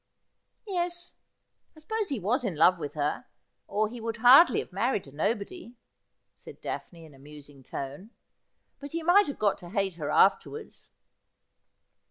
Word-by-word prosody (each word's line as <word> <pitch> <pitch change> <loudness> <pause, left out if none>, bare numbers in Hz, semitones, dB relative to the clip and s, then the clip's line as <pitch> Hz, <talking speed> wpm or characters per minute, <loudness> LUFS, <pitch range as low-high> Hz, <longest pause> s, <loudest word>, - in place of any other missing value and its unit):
' - - -52 0.2
Yes, 350 -3 -3 0.6
I - - -12
suppose 435 +6 -3
he 275 -5 -2
was 225 +7 0
in 200 -8 -2
love 170 +3 +4
with 145 -1 -6
her, 150 0 -2 0.4
or 210 +2 0
he 235 +2 -9
would 225 0 -4
hardly 250 +8 +7
have - - -4
married 210 +1 0
a 135 - -14
nobody,' 225 - -3 0.6
said - - -13
Daphne, 165 -2 -7
in 155 - -16
a 135 - -18
musing 145 -1 -14
tone; 140 - -7 0.4
' - - -49
but 285 +1 -9
he 335 0 -3
might 365 +4 +5
have 285 - -5
got 205 -2 +1
to 175 - -11
hate 195 -1 -1
her 150 -3 -4
afterwards.' 430 - +1
210 Hz, 170 wpm, -28 LUFS, -, 0.6 s, hardly